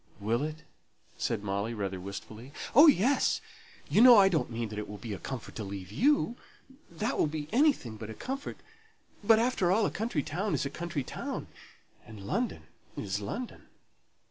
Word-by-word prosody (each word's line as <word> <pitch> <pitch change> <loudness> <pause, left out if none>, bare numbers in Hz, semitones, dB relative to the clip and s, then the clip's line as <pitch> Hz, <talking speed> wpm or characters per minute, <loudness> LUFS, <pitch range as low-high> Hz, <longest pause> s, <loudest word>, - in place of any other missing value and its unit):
"Will 115 +4 0
it?" 155 +2 -4 0.5
said 100 - -2
Molly, 100 +3 -2
rather 95 -3 -3
wistfully. 110 +7 -8 0.2
"Oh, 295 +7 +9
yes! 275 - +4 0.5
You 215 - +4
know 245 -2 +10
I 195 -1 +7
don't 160 -5 0
mean 115 -1 -3
that 105 0 -5
it 105 - -6
will 105 - -7
be 110 +1 -6
a 95 - -6
comfort 130 -4 -6
to 110 - -3
leave 95 -2 -7
you; 265 - +2 0.5
that 165 - -2
will - - +4
be 150 -1 -4
anything 240 - +2
but 110 0 -8
a 110 - -7
comfort. 275 +2 -5 0.7
But, 220 +2 +6
after 225 -6 +2
all, 210 +2 +3
a - - 0
country 220 - -2
town 190 +7 -2
is - - -1
a 140 - -3
country 170 -4 -3
town, - - -5 0.5
and 105 -3 -11
London 230 - -2 0.3
is 100 0 -2
London. 225 - -6
145 Hz, 180 wpm, -30 LUFS, -, 0.7 s, know